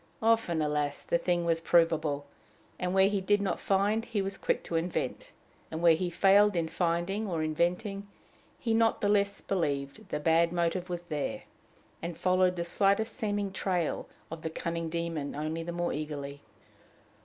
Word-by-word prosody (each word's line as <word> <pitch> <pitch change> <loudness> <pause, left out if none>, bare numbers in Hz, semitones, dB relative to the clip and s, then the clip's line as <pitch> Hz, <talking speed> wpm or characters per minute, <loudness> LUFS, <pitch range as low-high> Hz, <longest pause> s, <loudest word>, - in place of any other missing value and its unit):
Often, 225 -8 +2
alas! 150 -1 -1
the 170 - +1
thing 175 0 0
was 165 -1 +1
provable; 160 -4 +2 0.5
and, 180 0 -1
where 190 +1 +5
he 200 -1 0
did 205 +2 +3
not 200 -2 -1
find, 205 +3 +1
he 225 -3 -2
was 195 0 -2
quick - - -1
to 170 - -4
invent; 165 +2 -2 0.4
and, 160 - -4
where 170 -1 +7
he 175 +3 -1
failed 200 +3 +5
in 165 -1 +1
finding 175 +6 -1
or 165 -4 -1
inventing, 180 +6 -1 0.5
he 230 -3 -1
not 225 0 +3
the 205 - +2
less 200 -1 +2
believed 140 -7 -2
the 150 - -2
bad 165 +2 +3
motive 175 +1 -1
was 175 -1 -4
there, 150 -4 -3 0.6
and 170 -1 -5
followed 185 0 +3
the 170 - -2
slightest 200 +5 +1
seeming 205 -2 -1
trail 180 -4 -1 0.2
of 165 -1 -6
the 160 - -3
cunning 165 0 -3
demon 165 -3 -3
only 155 +2 -3
the 170 +1 -4
more 175 0 -1
eagerly. 145 -1 -5
175 Hz, 170 wpm, -30 LUFS, 160-195 Hz, 0.6 s, where